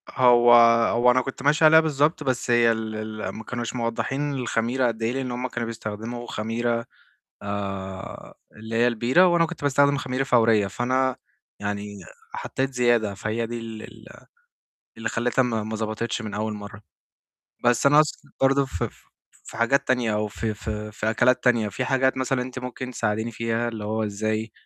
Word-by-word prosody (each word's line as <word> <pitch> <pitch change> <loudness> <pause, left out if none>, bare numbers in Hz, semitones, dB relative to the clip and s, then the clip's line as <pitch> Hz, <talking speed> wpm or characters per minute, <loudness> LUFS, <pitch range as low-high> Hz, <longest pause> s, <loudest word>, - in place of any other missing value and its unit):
هو 120 -1 +5 0.4
هو 120 +1 +4
أنا 130 +1 +3
كنت 135 +1 -7
ماشي 150 +2 +4
عليها 160 +1 +8
بالضبط، 155 0 +1
بس 130 -2 -1
هي 120 -1 +5
ال 110 -1 -3
ال 110 0 -5
ما 110 - -8
كانوش 120 0 -5
موضحّين 135 +5 -2
الخميرة 125 0 0
قد 115 -1 -4
إيه، 115 - +1
لأن 130 -1 -3
هُم 125 +1 -3
كانوا 120 -2 -4
بيستخدموا 115 +2 -6
خميرة، 115 +2 -2 0.6
آآ 100 -2 -6 0.2
اللي 110 +1 -8
هي 120 +1 +4
البيرة، 125 +9 +3
وأنا 170 -2 +3
كنت - - -9
باستخدم 140 0 +3
خميرة 130 0 -2
فورية، 115 -5 +3
فأنا 130 +5 0 0.4
يعني 100 0 -4 0.4
حطيت 135 +1 -2
زيادة، 120 -4 +2
فهي 110 +4 -3
دي 120 +1 -5
ال 110 -1 -8
ال - - -13 0.9
اللي 115 -1 -3
خلّتها 125 +3 +1
ما 115 -3 -1
ما 110 +1 -4
ظبطتش 110 +1 -3
من 110 -2 -6
أول 110 +1 -2
مرة. 105 0 -9 0.8
بس 120 +3 +3
أنا 145 +1 +5
أقصد 150 -1 +2
برضه 135 +1 +3
ف 110 -10 -6
ف - - -2 0.5
في - - -10
حاجات 120 +5 +1
تانية، 120 -4 +1
أو 105 0 -1
في 110 +1 -3
في 105 0 -6
في 110 +1 -1
أكلات 125 +3 +2
تانية، 120 -4 +3
في 105 +6 -3
حاجات 130 0 +1
مثلًا 130 0 0
أنتِ 130 +1 -7
ممكن 125 0 -6
تساعديني 110 -1 -2
فيها، 115 +1 -1
اللي 110 -3 -6
هو 110 +1 -1
إزاي، 110 +2 -2
120 Hz, 175 wpm, -24 LUFS, 110-130 Hz, 0.9 s, عليها